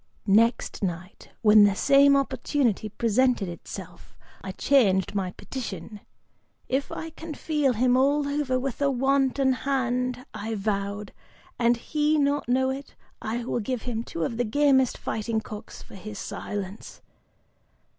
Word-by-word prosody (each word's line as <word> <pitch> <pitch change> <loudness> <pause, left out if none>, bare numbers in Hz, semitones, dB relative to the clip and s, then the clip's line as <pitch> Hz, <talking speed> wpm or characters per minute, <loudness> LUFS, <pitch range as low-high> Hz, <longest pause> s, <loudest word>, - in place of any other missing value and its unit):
"Next 225 +4 +2
night, 180 0 -5
when 210 -1 +8
the 200 -1 +4
same 280 +3 +5
opportunity 265 -5 0
presented 235 0 +1
itself, 175 +1 -9 0.3
I 190 - -4
changed 195 -11 +3
my 195 -3 -1
petition, 210 -5 -7 0.7
'If 265 +2 -1
I 325 0 -6
can 320 -1 -8
feel 295 -5 +1
him 245 +2 +3
all 280 +2 +3
over 285 -3 0
with 265 0 -4
a 280 - +3
wanton 270 0 +2
hand,' 250 -1 -1
I 220 +1 -4
vowed, 200 0 -3 0.5
'and 240 0 +3
he 300 +5 0
not 285 -3 +1
know 260 +1 +2
it, 275 +1 -7 0.3
I 230 +2 -3
will 240 - -1
give 240 +2 -3
him 230 -2 -3
two 165 -7 -4
of 230 - -2
the 245 - +1
gamest 265 +2 +3
fighting 220 +1 -2
cocks, 210 -1 -9
for - - -17
his 205 +2 -8
silence. 195 +1 -6
245 Hz, 145 wpm, -26 LUFS, 210-275 Hz, 0.7 s, when